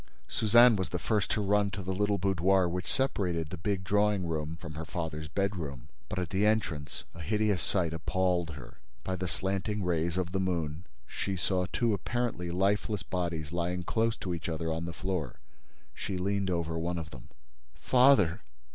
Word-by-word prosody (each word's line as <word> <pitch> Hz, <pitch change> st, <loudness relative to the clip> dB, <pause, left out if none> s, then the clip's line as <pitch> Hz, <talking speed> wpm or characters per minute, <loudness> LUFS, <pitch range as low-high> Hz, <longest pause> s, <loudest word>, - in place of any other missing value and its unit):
Suzanne 120 Hz, +2 st, +6 dB
was 95 Hz, -2 st, -1 dB
the 90 Hz, -, -2 dB
first 105 Hz, +2 st, 0 dB
to 105 Hz, -, +1 dB
run 100 Hz, 0 st, +3 dB
to 100 Hz, -1 st, -5 dB
the 95 Hz, +1 st, -2 dB
little 105 Hz, +1 st, +1 dB
boudoir 95 Hz, 0 st, +3 dB
which 90 Hz, +1 st, -3 dB
separated 90 Hz, -, 0 dB
the -, -, -3 dB
big 95 Hz, +1 st, -1 dB
drawing 105 Hz, 0 st, +2 dB
room 80 Hz, -1 st, -2 dB
from 85 Hz, -2 st, -8 dB
her 80 Hz, +2 st, -5 dB
father's 80 Hz, -1 st, -4 dB
bedroom. 80 Hz, -7 st, -3 dB, 0.2 s
But, -, -, -4 dB
at 90 Hz, -3 st, -2 dB
the 95 Hz, +2 st, +1 dB
entrance, 90 Hz, -9 st, 0 dB
a 85 Hz, -, -9 dB
hideous 105 Hz, +1 st, +1 dB
sight 85 Hz, -2 st, 0 dB
appalled 85 Hz, +1 st, 0 dB
her. 70 Hz, -, -11 dB, 0.2 s
By 95 Hz, -, -2 dB
the 90 Hz, 0 st, -3 dB
slanting 95 Hz, +3 st, -1 dB
rays 85 Hz, 0 st, 0 dB
of 90 Hz, -1 st, -1 dB
the 95 Hz, -, 0 dB
moon, 85 Hz, -3 st, -2 dB, 0.2 s
she 95 Hz, +9 st, -3 dB
saw 90 Hz, 0 st, 0 dB
two 115 Hz, -3 st, +2 dB
apparently 115 Hz, -4 st, -2 dB
lifeless 100 Hz, +2 st, +1 dB
bodies 85 Hz, -4 st, -2 dB
lying 90 Hz, +1 st, -1 dB
close 115 Hz, +5 st, +1 dB
to 90 Hz, -, -3 dB
each 85 Hz, 0 st, -4 dB
other 80 Hz, 0 st, -1 dB
on 80 Hz, +1 st, -3 dB
the 85 Hz, -, -4 dB
floor. 90 Hz, -7 st, -3 dB, 0.6 s
She 95 Hz, -, -4 dB
leaned 100 Hz, +1 st, 0 dB
over 85 Hz, -2 st, -1 dB
one 85 Hz, +2 st, -1 dB
of 80 Hz, -2 st, -5 dB
them: 65 Hz, -, -11 dB, 0.5 s
"Father! 125 Hz, -10 st, +5 dB
90 Hz, 180 wpm, -30 LUFS, 85-100 Hz, 0.6 s, Suzanne